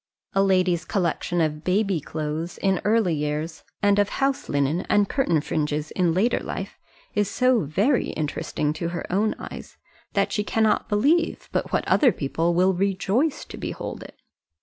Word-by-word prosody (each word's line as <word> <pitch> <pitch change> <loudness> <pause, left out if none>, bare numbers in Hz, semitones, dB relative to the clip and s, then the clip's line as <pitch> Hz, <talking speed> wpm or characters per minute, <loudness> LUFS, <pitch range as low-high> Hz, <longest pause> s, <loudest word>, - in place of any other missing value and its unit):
A 195 - +3
lady's 185 -3 +2
collection 175 -2 -1
of 155 -1 -1
baby 195 -1 +1
clothes, 155 +3 -4
in 190 -2 +1
early 215 -5 +2
years, 150 +2 -3 0.2
and 205 0 +4
of 205 0 +2
house 275 0 -1
linen 145 +5 +1
and 205 -1 +4
curtain 175 - +1
fringes 150 -1 -2
in 180 -3 +1
later 200 +9 +2
life, - - -6 0.3
is 205 -1 +1
so 255 -1 +3
very 205 - +1
interesting 150 0 -2
to 170 +2 -3
her 175 0 -4
own 210 +3 +1
eyes, - - -9 0.4
that - - +1
she 210 - 0
cannot 220 0 +1
believe 295 +11 +1
but - - -1
what - - 0
other 270 -6 +5
people 165 +3 -1
will 185 +2 +4
rejoice 200 - 0
to - - -10
behold - - -5
it. - - -12
185 Hz, 165 wpm, -24 LUFS, 160-210 Hz, 0.4 s, other